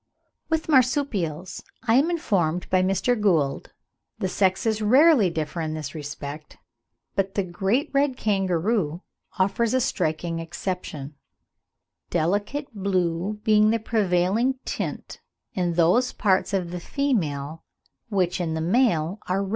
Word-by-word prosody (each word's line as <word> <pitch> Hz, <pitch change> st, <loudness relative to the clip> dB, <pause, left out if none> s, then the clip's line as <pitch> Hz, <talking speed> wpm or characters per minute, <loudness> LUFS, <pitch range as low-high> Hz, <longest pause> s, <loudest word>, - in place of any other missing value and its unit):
With 320 Hz, -1 st, 0 dB
Marsupials, 235 Hz, -, +1 dB
as -, -, -15 dB, 0.3 s
I -, -, +6 dB
am 275 Hz, +7 st, +4 dB
informed 180 Hz, -, 0 dB
by 185 Hz, 0 st, +4 dB
Mr. 195 Hz, +6 st, +1 dB
Gould, 165 Hz, -, +1 dB, 0.5 s
the 190 Hz, -, -1 dB
sexes 200 Hz, +4 st, +1 dB
rarely 255 Hz, -, +5 dB
differ 160 Hz, 0 st, -3 dB
in 155 Hz, -1 st, -3 dB
this 150 Hz, -4 st, -5 dB
respect; 150 Hz, 0 st, -7 dB, 0.6 s
but 195 Hz, 0 st, -1 dB
the 200 Hz, -, +1 dB
great 195 Hz, +9 st, -1 dB
red 275 Hz, -2 st, +2 dB
kangaroo 190 Hz, -3 st, 0 dB, 0.3 s
offers 210 Hz, +5 st, +1 dB
a -, -, +3 dB
striking 165 Hz, -8 st, -1 dB
exception, 165 Hz, -4 st, -5 dB, 0.9 s
"delicate 205 Hz, -, -1 dB
blue 190 Hz, 0 st, -1 dB
being 215 Hz, 0 st, +4 dB
the 225 Hz, -, +2 dB
prevailing 215 Hz, +3 st, +1 dB
tint -, -, -5 dB, 0.3 s
in 175 Hz, -2 st, 0 dB
those 180 Hz, +10 st, +3 dB
parts 190 Hz, -4 st, +1 dB
of 185 Hz, -3 st, -1 dB
the 180 Hz, -, -4 dB
female 165 Hz, -, -2 dB, 0.5 s
which 185 Hz, -4 st, 0 dB
in 160 Hz, -2 st, -2 dB
the -, -, -2 dB
male 180 Hz, -1 st, +1 dB
are 190 Hz, +2 st, 0 dB
red." 195 Hz, -, -5 dB
190 Hz, 130 wpm, -24 LUFS, 165-225 Hz, 0.9 s, I